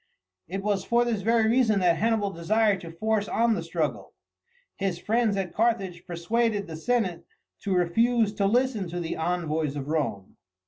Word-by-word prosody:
It 195 +4 -4
was 200 -2 0
for 240 +1 +2
this 225 -4 -1
very 225 +2 +3
reason 225 -3 +3
that 175 -2 +3
Hannibal 220 -1 +1
desired 200 +3 +1
to 170 - -8
force 215 +4 -1
on 230 0 +2
the - - -2
struggle. - - -3 0.6
His 190 -3 -1
friends 220 +2 +1
at 190 -2 -3
Carthage 200 -6 -1
persuaded 205 +5 0
the 160 - -7
senate 185 -2 -1 0.4
to 195 -2 -1
refuse 220 +5 +2
to 200 -2 +1
listen 235 -4 +1
to 175 +1 -4
the 165 -2 -3
envoys 160 -3 -1
of 145 0 -5
Rome. 115 -12 -2
200 Hz, 170 wpm, -26 LUFS, 170-225 Hz, 0.6 s, very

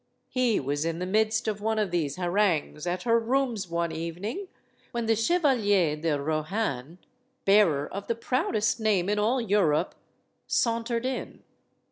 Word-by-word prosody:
He 250 -4 +2
was 145 +2 -2
in 165 0 -2
the 180 - -3
midst 220 +4 +1
of 210 -1 -2
one 220 +1 0
of 210 -4 0
these 155 -5 -1
harangues, 175 -4 0
at 180 +1 -2
her 230 -1 +3
rooms 235 -5 -1
one 170 0 -1
evening, 175 - -4 0.5
when 235 -1 -1
the 225 0 +3
Chevalier 225 - +2
de 150 -1 -1
Rohan 155 - -2 0.5
bearer 180 -8 +4
of 200 +1 -7
the 230 - 0
proudest 230 -2 0
name 205 -4 +1
in 210 0 +1
all 230 +5 +2
Europe 190 -8 +2 0.5
sauntered 230 0 0
in. 260 -1 -4
205 Hz, 150 wpm, -27 LUFS, 165-230 Hz, 0.5 s, bearer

